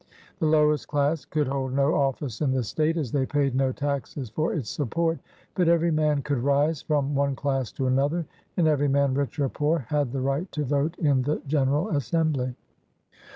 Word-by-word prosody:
The 160 Hz, -, +1 dB
lowest 150 Hz, -1 st, +3 dB
class 145 Hz, -1 st, 0 dB
could 150 Hz, 0 st, 0 dB
hold 135 Hz, -1 st, -2 dB
no 140 Hz, +2 st, +2 dB
office 135 Hz, -3 st, -1 dB
in 140 Hz, -3 st, +2 dB
the 130 Hz, -2 st, 0 dB
state, 155 Hz, +9 st, 0 dB
as 140 Hz, -8 st, -2 dB
they 135 Hz, -2 st, 0 dB
paid 140 Hz, -2 st, +1 dB
no 130 Hz, 0 st, +1 dB
taxes 140 Hz, -3 st, -3 dB
for 155 Hz, +8 st, 0 dB
its 135 Hz, -9 st, -3 dB
support; 165 Hz, +4 st, -1 dB, 0.3 s
but 180 Hz, -2 st, +1 dB
every 170 Hz, 0 st, +3 dB
man 150 Hz, -2 st, +1 dB
could 145 Hz, -4 st, -1 dB
rise 145 Hz, +4 st, +1 dB
from 145 Hz, -2 st, 0 dB
one 140 Hz, -1 st, +1 dB
class 135 Hz, -4 st, -1 dB
to 135 Hz, -, -2 dB
another, 140 Hz, +6 st, +1 dB, 0.3 s
and 170 Hz, -3 st, +3 dB
every 145 Hz, -2 st, +2 dB
man, 140 Hz, -1 st, +2 dB
rich 140 Hz, +2 st, -2 dB
or 140 Hz, -, +2 dB
poor, 150 Hz, +5 st, +1 dB
had 145 Hz, -4 st, 0 dB
the 135 Hz, 0 st, -2 dB
right 140 Hz, +7 st, -1 dB
to 150 Hz, -, -1 dB
vote 145 Hz, +5 st, 0 dB
in 145 Hz, -5 st, +2 dB
the 145 Hz, +4 st, -1 dB
general 145 Hz, +5 st, +1 dB
assembly. 145 Hz, -4 st, 0 dB
145 Hz, 195 wpm, -26 LUFS, 135-155 Hz, 0.3 s, lowest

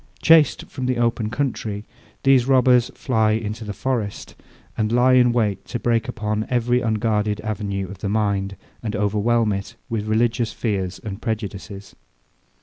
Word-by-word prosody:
Chaced 160 Hz, -3 st, +5 dB
from 130 Hz, -1 st, -5 dB
the 130 Hz, -1 st, 0 dB
open 115 Hz, -2 st, 0 dB
country, 110 Hz, -5 st, -3 dB, 0.4 s
these 135 Hz, -2 st, +4 dB
robbers 125 Hz, -2 st, +4 dB
fly 110 Hz, -5 st, +1 dB
into 110 Hz, 0 st, -3 dB
the 105 Hz, -, -5 dB
forest, 110 Hz, -1 st, -3 dB, 0.4 s
and 110 Hz, -1 st, 0 dB
lie 125 Hz, +2 st, +4 dB
in 125 Hz, -1 st, +5 dB
wait 110 Hz, -5 st, 0 dB
to 120 Hz, -, -4 dB
break 115 Hz, -1 st, +1 dB
in -, -, -7 dB
upon 105 Hz, 0 st, -2 dB
every 125 Hz, 0 st, +1 dB
unguarded 110 Hz, -2 st, 0 dB
avenue 100 Hz, -3 st, -3 dB
of 95 Hz, 0 st, -10 dB
the 100 Hz, -, -3 dB
mind, 100 Hz, -2 st, 0 dB, 0.3 s
and 110 Hz, -3 st, -3 dB
overwhelm 105 Hz, +2 st, +1 dB
it 100 Hz, 0 st, -5 dB
with 110 Hz, -2 st, -2 dB
religious 115 Hz, +1 st, +1 dB
fears 95 Hz, -4 st, -2 dB
and 105 Hz, 0 st, -6 dB
prejudices. 100 Hz, -3 st, -5 dB
110 Hz, 155 wpm, -22 LUFS, 105-120 Hz, 0.4 s, Chaced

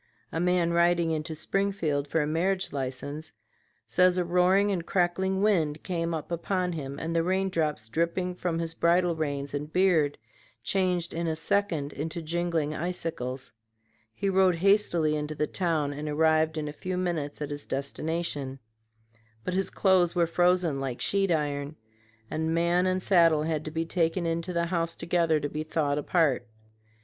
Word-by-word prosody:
A 165 Hz, -, -2 dB
man 175 Hz, -1 st, +2 dB
riding 170 Hz, -1 st, +3 dB
into 155 Hz, 0 st, -3 dB
Springfield 165 Hz, -5 st, -1 dB
for 155 Hz, +2 st, +1 dB
a -, -, -1 dB
marriage 185 Hz, +5 st, 0 dB
license 140 Hz, +3 st, -5 dB, 0.5 s
says 180 Hz, +11 st, +3 dB
a 180 Hz, -, +1 dB
roaring 180 Hz, +4 st, +3 dB
and 180 Hz, -4 st, -1 dB
crackling 190 Hz, +2 st, 0 dB
wind 160 Hz, -8 st, +1 dB
came 170 Hz, -2 st, -2 dB
upon 175 Hz, +3 st, -2 dB
him 140 Hz, -3 st, -5 dB
and 165 Hz, +2 st, -3 dB
the 165 Hz, -, +3 dB
rain 190 Hz, +3 st, +1 dB
drops 150 Hz, -10 st, -1 dB
dripping 170 Hz, +7 st, -1 dB
from 175 Hz, -2 st, -2 dB
his 165 Hz, -1 st, -2 dB
bridle 170 Hz, +1 st, +2 dB
reins 145 Hz, -3 st, -3 dB
and 145 Hz, +1 st, -4 dB
beard 170 Hz, -6 st, +3 dB, 0.5 s
changed 180 Hz, -3 st, 0 dB
in 170 Hz, +1 st, -2 dB
a 160 Hz, -, 0 dB
second 165 Hz, -5 st, 0 dB
into 160 Hz, +4 st, -4 dB
jingling 165 Hz, -2 st, -1 dB
icicles. 155 Hz, -7 st, -4 dB, 0.6 s
He 200 Hz, -, -2 dB
rode 190 Hz, -2 st, +4 dB
hastily 175 Hz, -4 st, +3 dB
into 150 Hz, 0 st, -3 dB
the 150 Hz, -, 0 dB
town 155 Hz, -4 st, -1 dB
and 150 Hz, +1 st, -5 dB
arrived 160 Hz, +1 st, +2 dB
in 150 Hz, -1 st, -2 dB
a 150 Hz, -, -5 dB
few 185 Hz, +4 st, -4 dB
minutes 165 Hz, -6 st, -2 dB
at 150 Hz, -1 st, -4 dB
his 145 Hz, 0 st, -6 dB
destination; 140 Hz, 0 st, -3 dB, 0.9 s
but 185 Hz, -, -3 dB
his 190 Hz, +1 st, +1 dB
clothes 185 Hz, -3 st, +3 dB
were 170 Hz, -1 st, +3 dB
frozen 175 Hz, -3 st, +2 dB
like 130 Hz, -3 st, -3 dB
sheet 195 Hz, -1 st, +1 dB
iron, 145 Hz, -2 st, -1 dB, 0.5 s
and 160 Hz, +4 st, -1 dB
man 175 Hz, +2 st, +2 dB
and 185 Hz, 0 st, 0 dB
saddle 165 Hz, -5 st, +4 dB
had 155 Hz, -1 st, -1 dB
to -, -, -3 dB
be 165 Hz, +1 st, -2 dB
taken 170 Hz, +1 st, 0 dB
into 165 Hz, +2 st, -1 dB
the 170 Hz, -1 st, 0 dB
house 170 Hz, -1 st, -1 dB
together 165 Hz, -2 st, +1 dB
to 145 Hz, -, -2 dB
be 150 Hz, +1 st, -4 dB
thawed 150 Hz, -2 st, 0 dB
apart. 145 Hz, -6 st, +1 dB
165 Hz, 165 wpm, -28 LUFS, 150-180 Hz, 0.9 s, rode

